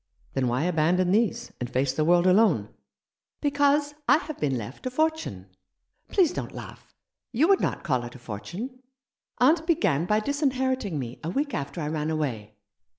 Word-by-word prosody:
"Then 135 Hz, -2 st, 0 dB
why 125 Hz, +4 st, 0 dB
abandon 180 Hz, +2 st, +2 dB
these, 215 Hz, -2 st, +1 dB
and 125 Hz, -, -3 dB
face 130 Hz, +1 st, 0 dB
the 155 Hz, -, 0 dB
world 175 Hz, +2 st, +4 dB
alone?" 185 Hz, -, +4 dB, 0.7 s
"Because 285 Hz, 0 st, +2 dB, 0.2 s
I -, -, +7 dB
have 310 Hz, -2 st, -7 dB
been 135 Hz, -4 st, 0 dB
left 120 Hz, -, -6 dB
a -, -, 0 dB
fortune. 255 Hz, -, -2 dB, 0.5 s
Please 365 Hz, -6 st, +3 dB
don't -, -, -5 dB
laugh. -, -, -10 dB, 0.4 s
You 270 Hz, +7 st, +3 dB
would 390 Hz, -, +5 dB
not -, -, -1 dB
call 130 Hz, -5 st, 0 dB
it 120 Hz, -, -9 dB
a -, -, -8 dB
fortune. 175 Hz, -, -7 dB, 0.6 s
Aunt 315 Hz, +6 st, +3 dB
began 180 Hz, -, +2 dB
by 210 Hz, +2 st, +3 dB
disinheriting 260 Hz, -, 0 dB
me 125 Hz, -3 st, -5 dB
a 160 Hz, -, -2 dB
week 285 Hz, -, -1 dB
after 140 Hz, +4 st, -4 dB
I 150 Hz, -, -2 dB
ran 155 Hz, 0 st, -2 dB
away. 120 Hz, -10 st, -3 dB
180 Hz, 170 wpm, -26 LUFS, -, 0.7 s, I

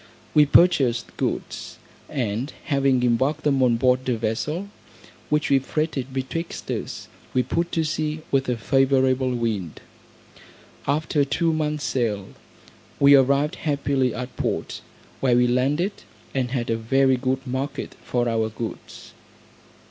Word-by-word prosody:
We 150 Hz, -1 st, +6 dB
purchased 135 Hz, -8 st, +3 dB
goods, -, -, -4 dB, 0.3 s
and 120 Hz, +1 st, -2 dB
having 135 Hz, -3 st, +2 dB
embarked 130 Hz, +6 st, +1 dB
them 140 Hz, -3 st, +2 dB
on 120 Hz, -2 st, +4 dB
board 130 Hz, +1 st, +2 dB
a 120 Hz, -, +1 dB
vessel, 135 Hz, -, -2 dB, 0.6 s
which 150 Hz, -1 st, +1 dB
we 135 Hz, -, +6 dB
freighted 140 Hz, -1 st, -2 dB
betwixt 135 Hz, +6 st, -4 dB
us, -, -, -5 dB, 0.3 s
we 125 Hz, -, +3 dB
put 170 Hz, +7 st, -1 dB
to 165 Hz, -, +1 dB
sea 155 Hz, 0 st, -2 dB
with 135 Hz, -1 st, +1 dB
a 125 Hz, -, 0 dB
favourable 130 Hz, +1 st, +2 dB
wind. 110 Hz, -9 st, -2 dB, 1.1 s
After 150 Hz, +1 st, +1 dB
two 160 Hz, +4 st, +1 dB
months 150 Hz, -1 st, -1 dB
sail, 105 Hz, -6 st, -1 dB, 0.7 s
we 140 Hz, 0 st, +7 dB
arrived 140 Hz, +2 st, +4 dB
happily 140 Hz, -3 st, 0 dB
at 125 Hz, +2 st, -6 dB
port, -, -, -2 dB, 0.4 s
where 125 Hz, -3 st, +3 dB
we 125 Hz, 0 st, +4 dB
landed, 140 Hz, +10 st, +1 dB, 0.4 s
and 130 Hz, -2 st, 0 dB
had 120 Hz, -3 st, -2 dB
a 115 Hz, -, +1 dB
very 130 Hz, +4 st, +3 dB
good 130 Hz, +1 st, -2 dB
market 130 Hz, +3 st, -4 dB
for 120 Hz, -1 st, 0 dB
our 110 Hz, -1 st, 0 dB
goods. 110 Hz, +1 st, -8 dB
135 Hz, 135 wpm, -24 LUFS, 125-145 Hz, 1.1 s, we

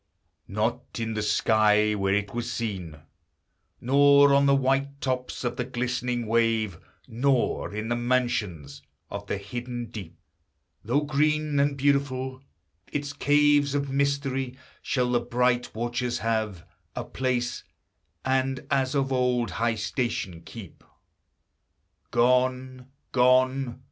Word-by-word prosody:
Not 115 Hz, +5 st, -2 dB
in 115 Hz, -1 st, -2 dB
the 110 Hz, -, -2 dB
sky, 105 Hz, 0 st, +3 dB
Where 100 Hz, -1 st, +1 dB
it 105 Hz, 0 st, -2 dB
was 120 Hz, 0 st, -3 dB
seen, 90 Hz, -9 st, -4 dB, 0.8 s
Nor 140 Hz, +2 st, +5 dB
on 140 Hz, 0 st, +4 dB
the 140 Hz, -, +5 dB
white 135 Hz, +1 st, 0 dB
tops 130 Hz, -2 st, -3 dB
of 120 Hz, 0 st, -2 dB
the 125 Hz, -, 0 dB
glistening 125 Hz, -1 st, -2 dB
wave, 110 Hz, -5 st, +1 dB, 0.3 s
Nor 125 Hz, +2 st, 0 dB
in 110 Hz, +1 st, -3 dB
the 120 Hz, -, 0 dB
mansions 120 Hz, -, -1 dB, 0.3 s
of 100 Hz, 0 st, -6 dB
the -, -, -1 dB
hidden 120 Hz, +3 st, -6 dB
deep, 100 Hz, -8 st, -8 dB, 0.7 s
Though 130 Hz, +7 st, +1 dB
green, 150 Hz, 0 st, +1 dB
And 140 Hz, 0 st, +1 dB
beautiful, 130 Hz, -2 st, 0 dB, 0.5 s
its 145 Hz, -1 st, -3 dB
caves 145 Hz, 0 st, +3 dB
of 140 Hz, -1 st, -1 dB
mystery; 135 Hz, -2 st, -1 dB, 0.2 s
Shall 125 Hz, -2 st, 0 dB
the 120 Hz, -, +3 dB
bright 120 Hz, 0 st, 0 dB
watcher 120 Hz, +2 st, -2 dB
have 110 Hz, -6 st, -1 dB, 0.3 s
A -, -, -3 dB
place, 125 Hz, -1 st, -2 dB, 0.6 s
and 130 Hz, 0 st, 0 dB
as 135 Hz, 0 st, +1 dB
of 135 Hz, -1 st, +1 dB
old 125 Hz, -2 st, +1 dB
high 115 Hz, 0 st, 0 dB
station 110 Hz, -6 st, -3 dB
keep. 95 Hz, 0 st, -11 dB, 1.3 s
Gone, 125 Hz, +1 st, +1 dB, 0.2 s
gone! 130 Hz, 0 st, +3 dB
125 Hz, 125 wpm, -26 LUFS, 115-135 Hz, 1.3 s, Nor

